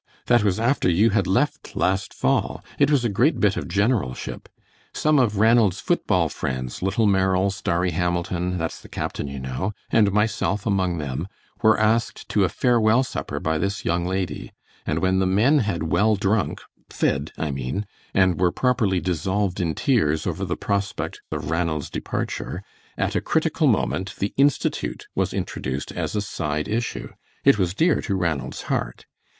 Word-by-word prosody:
That 120 -3 +4
was 100 -1 +1
after 120 -4 +2
you 100 +6 +4
had 100 -3 +1
left 145 +11 0
last 95 +2 0
fall. - - 0
It 140 - +5
was 140 -5 +2
a - - +4
great 120 +10 +2
bit 100 -2 +3
of - - -4
generalship. 100 - -1 0.5
Some 155 -2 +3
of 110 -5 +2
Ranald's 110 -3 +4
foot - - -1
ball - - +3
friends, 65 -1 -4
Little 95 +4 +1
Merrill, 95 -1 +2
Starry 90 -1 -1
Hamilton, 90 +1 -1
that's 80 -1 -4
the - - -14
captain, - - -4
you 70 0 -6
know, 65 +10 -3 0.2
and 105 -3 +4
myself 105 -1 0
among 95 -4 +1
them, 75 +3 -3 0.3
were 110 -1 +5
asked 110 +2 +1
to 105 - +2
a 95 - +2
farewell 120 0 +3
supper 70 - -4
by 80 0 -1
this 100 +3 -2
young 85 +1 +1
lady, 95 -1 -3 0.4
and 80 - 0
when 95 0 +3
the 95 - +2
men 115 +11 +4
had 100 - -1
well 105 +7 +2
drunk 100 +1 0 0.3
fed, 70 +2 -1
I 80 -2 -2
mean 70 +9 -3 0.3
and 95 -2 +3
were 90 -1 +4
properly 110 -8 +1
dissolved 95 +2 -1
in 85 -3 -1
tears 80 - +1
over 90 +2 -2
the 90 - -3
prospect 100 -1 -2
of 75 - -3
Ranald's 80 -3 -1
departure, - - -4 0.3
at - - -1
a - - +1
critical - - +1
moment 75 +10 0
the 100 - -2
Institute 135 - +1
was - - 0
introduced 65 +2 -4
as - - -3
a 105 - +1
side 75 -6 -3
issue. 115 +3 -2 0.3
It 135 -6 +5
was 90 -1 0
dear 165 +7 +3
to 100 - -2
Ranald's 85 -7 -2
heart. - - -3
95 Hz, 170 wpm, -23 LUFS, 85-110 Hz, 0.5 s, It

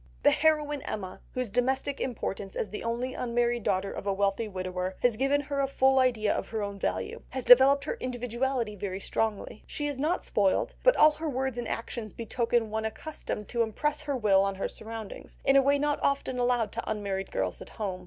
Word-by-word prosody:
The - - +7
heroine 300 -2 +2
Emma, 190 -3 -5
whose 255 -4 -2
domestic 265 +4 0
importance 200 -5 -3
as 205 - -3
the 210 - -5
only 240 +3 -2
unmarried 240 0 0
daughter 195 0 0
of 205 - -6
a 200 - +2
wealthy 200 +3 0
widower 185 -1 -3
has 245 -3 +4
given 275 +4 +2
her 285 0 -3
a 275 - +1
full 265 0 +3
idea 235 -5 +2
of - - -3
her 220 -2 -3
own 200 -1 -5
value, 95 - -2
has 260 -2 -4
developed 270 +3 +7
her - - -1
individuality 245 -2 -2
very 190 -1 -4
strongly. 215 +1 -2
She 295 - -3
is 290 -2 -3
not 315 +6 0
spoilt, 205 - +1
but - - +5
all 305 - +8
her 310 +1 -4
words 265 -2 -2
and 240 - -3
actions 230 -2 -4
betoken 230 -1 0
one 220 0 -1
accustomed 220 -3 -5
to 235 - 0
impress 295 +7 -1
her 285 -3 -2
will 200 -5 +4
on 195 0 0
her 190 - -2
surroundings, 220 -2 -8
in 270 - +5
a 275 - +8
way 280 +1 +3
not 290 0 0
often 275 -2 0
allowed 245 -3 +1
to 230 - -4
unmarried 200 -2 -2
girls 95 -2 -2
at - - -9
home. 195 -4 -4
235 Hz, 205 wpm, -29 LUFS, 205-270 Hz, -, all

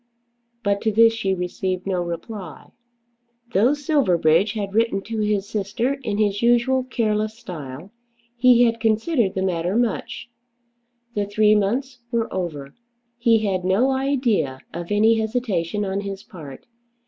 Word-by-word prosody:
But 200 -1 0
to 220 - +1
this 225 +2 +5
she 195 -4 -1
received 185 +1 -3
no 185 -2 -1
reply. 170 - -7 0.8
Though 240 +9 +4
Silverbridge 205 - +2
had 200 -3 -4
written 220 -3 +1
to 225 0 -4
his 210 -2 0
sister 220 +5 -1
in 215 -5 -2
his 205 -1 +1
usual 240 +2 +3
careless 215 -3 -1
style, 160 - -8 0.4
he 245 0 +5
had 230 -1 +1
considered 225 - +1
the 190 - -1
matter 180 0 -1
much. 235 0 -2 0.8
The 205 -1 -1
three 210 +1 +3
months 245 +6 0
were 235 -2 -1
over. 150 -7 -4 0.5
He 230 -2 +3
had 185 -2 -1
no 200 +9 +2
idea 250 - 0
of 170 +2 -6
any 220 +2 +4
hesitation 210 -4 -1
on 195 0 -2
his 200 -1 -6
part. 145 -8 -11
210 Hz, 140 wpm, -22 LUFS, 190-230 Hz, 0.8 s, this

